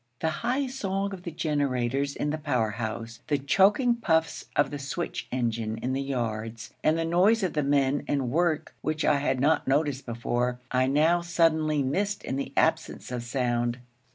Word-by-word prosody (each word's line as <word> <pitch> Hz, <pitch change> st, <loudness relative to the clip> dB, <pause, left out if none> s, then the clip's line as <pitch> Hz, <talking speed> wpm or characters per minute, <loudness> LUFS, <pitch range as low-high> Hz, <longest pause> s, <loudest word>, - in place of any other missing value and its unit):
The 160 Hz, -, +1 dB
high 255 Hz, +4 st, +1 dB
song 200 Hz, -6 st, -2 dB
of 185 Hz, -, -7 dB
the 175 Hz, -, -5 dB
generators 140 Hz, -3 st, -1 dB
in 145 Hz, -, -1 dB
the 155 Hz, -, -3 dB
power 130 Hz, -8 st, 0 dB
house, 115 Hz, +1 st, -5 dB
the 145 Hz, -, +2 dB
choking 195 Hz, -, +4 dB
puffs 160 Hz, -9 st, 0 dB
of 145 Hz, -2 st, +2 dB
the 145 Hz, -, -4 dB
switch 145 Hz, +5 st, -4 dB
engine 115 Hz, -3 st, -1 dB
in 125 Hz, +3 st, -2 dB
the 135 Hz, -, -1 dB
yards, 115 Hz, -4 st, -4 dB
and 155 Hz, +1 st, +3 dB
the 165 Hz, -, 0 dB
noise 190 Hz, +6 st, +3 dB
of 180 Hz, -, -1 dB
men 140 Hz, 0 st, +2 dB
and 135 Hz, -4 st, 0 dB
work 165 Hz, 0 st, 0 dB
which 155 Hz, 0 st, -1 dB
I 150 Hz, -2 st, +4 dB
had 135 Hz, -2 st, 0 dB
not 150 Hz, +4 st, +2 dB
noticed 140 Hz, -1 st, +1 dB
before, 120 Hz, +1 st, -1 dB
I 130 Hz, 0 st, +2 dB
now 155 Hz, +5 st, +3 dB
suddenly 160 Hz, -3 st, +2 dB
missed 200 Hz, +10 st, -1 dB
in 130 Hz, -, -3 dB
the 140 Hz, -, -3 dB
absence -, -, 0 dB
of 125 Hz, -1 st, -2 dB
sound. 120 Hz, -1 st, -1 dB
145 Hz, 180 wpm, -27 LUFS, 125-165 Hz, -, choking